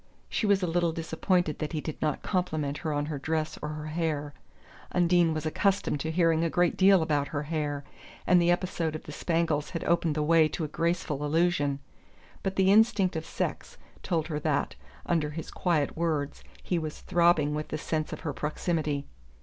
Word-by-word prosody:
She 215 - 0
was 200 -2 +3
a - - +3
little 170 0 +1
disappointed 165 0 0
that 155 +2 -3
he 155 - -1
did 155 0 -6
not 155 -2 -1
compliment 155 -6 -1
her 160 - -2
on 145 0 0
her 150 -2 -4
dress 155 +2 -2
or 150 - -3
her 155 0 -5
hair 155 -2 -2 0.6
Undine 175 -1 +3
was 155 0 -3
accustomed 190 -1 +1
to 160 - -3
hearing 165 -1 +2
a 165 - +1
great 175 +1 +2
deal 190 -2 +5
about 145 -2 0
her 145 -1 -3
hair, 145 -2 -2 0.4
and 180 -1 +5
the 170 - +3
episode 175 -3 0
of 155 - -6
the - - -9
spangles 165 -2 0
had 165 - -4
opened 170 -2 +1
the 150 - 0
way 160 0 +5
to 155 +2 -4
a - - -1
graceful 165 -2 -1
allusion 150 -2 +1 0.6
but 195 0 -2
the 190 0 +4
instinct 205 -4 +4
of 160 0 -4
sex - - -4 0.2
told 165 -4 0
her 155 -2 -3
that, 150 -1 0 0.3
under 160 -3 +1
his 155 +1 -6
quiet 160 -6 0
words, 155 -4 -2 0.2
he 175 - 0
was 155 -1 -6
throbbing 170 -4 +3
with 150 0 -3
the 155 - -3
sense 155 0 -2
of - - -6
her 145 - -3
proximity. 150 -1 -2
160 Hz, 195 wpm, -28 LUFS, 150-175 Hz, 0.6 s, deal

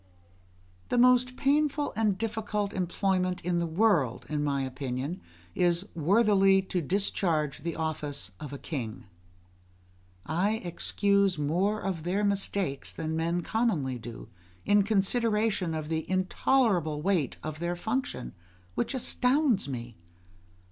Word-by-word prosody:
The - - +1
most 250 +1 +4
painful 290 +1 +1
and 215 -3 +1
difficult 210 -2 -2
employment 185 0 0
in 175 0 0
the 170 - -1
world, 165 - +2
in 150 -1 -1
my 140 -2 0
opinion, 130 +5 -4 0.3
is 175 +2 +1
worthily 195 +2 +4
to 185 -1 -2
discharge 165 -4 0
the 170 0 -4
office 150 -3 -3
of 150 -3 -7
a 140 - -5
king. 125 -5 -5 1.2
I 180 +7 +1
excuse 200 +2 +1
more 180 +9 0
of 185 -4 -2
their 185 +5 -1
mistakes 195 -7 -1
than 160 0 -3
men 170 +2 0
commonly 160 - 0
do, 115 0 -9 0.4
in 205 0 +5
consideration 210 -3 +1
of 155 -1 -4
the 160 0 -3
intolerable 185 - +1
weight 175 -9 +1
of 155 0 -5
their 175 +1 -1
function, 220 - -3 0.4
which 270 - -1
astounds 250 - +2
me. 120 -2 -6
180 Hz, 125 wpm, -29 LUFS, 155-210 Hz, 1.2 s, in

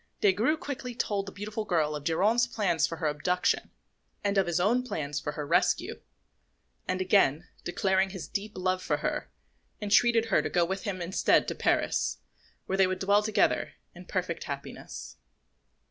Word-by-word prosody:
Des 205 - +5
Grieux 240 +12 +1
quickly 270 -6 -6
told 200 -3 -1
the - - -6
beautiful 215 +2 -4
girl 160 -6 +1
of 150 - -6
Geronte's 210 +10 +2
plot 195 -8 0
for 165 - +2
her 160 - -4
abduction, 155 +5 0 0.5
and 200 0 +1
of 195 -2 +3
his 175 0 +1
own 220 +7 +3
plans 150 - -3
for 150 - -4
her 150 0 -4
rescue; - - +1 0.9
and 185 0 -1
again 180 -4 +3 0.2
declaring 190 +2 +1
his 190 -2 -7
deep 210 +1 -4
love 185 0 0
for - - 0
her, - - -3 0.5
entreated 225 +2 +4
her - - +5
to - - -3
go 175 -1 +2
with 190 +2 -4
him 185 -3 -3
instead 180 +3 +2
to - - -1
Paris, - - +1 0.5
where 190 +1 -2
they 190 - +6
would 185 0 -2
dwell 200 +2 +3
together 210 0 +1 0.2
in - - -12
perfect - - -3
happiness. - - -7
190 Hz, 175 wpm, -29 LUFS, 175-210 Hz, 0.9 s, they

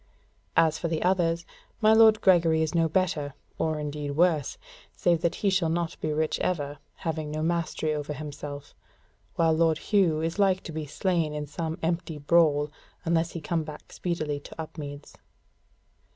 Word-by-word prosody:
As 160 -1 +4
for 170 - -1
the 160 -1 -1
others, 170 -2 +1 0.3
my 215 -1 +5
lord 220 -1 +6
Gregory 165 -4 +4
is 155 - -2
no 165 -1 +2
better, 155 -5 0 0.2
or 155 -1 0
indeed 150 -1 -4
worse, 160 -4 +2 0.4
save 170 -2 +2
that 170 - +1
he 200 - +4
shall 185 -4 +2
not 170 0 -1
be 155 - -1
rich 155 +1 0
ever, 145 -5 -2 0.2
having 155 -2 -3
no 155 +1 -3
mastery 165 -2 0
over 150 0 -3
himself; 145 -1 -7 0.6
while 165 -1 +3
lord 160 -1 +3
Hugh 180 -5 +2
is 165 +4 -2
like 190 -2 +3
to - - -7
be 155 -1 -4
slain 165 -1 0
in 150 0 -3
some 160 +2 -4
empty 165 -1 -1
brawl, 150 -1 +3 0.3
unless 165 0 +1
he 170 - -5
come 165 +1 -1
back 150 -1 -10
speedily 155 -5 -2
to 145 - -13
Upmeads." 145 -2 -7
160 Hz, 165 wpm, -27 LUFS, 150-170 Hz, 0.6 s, lord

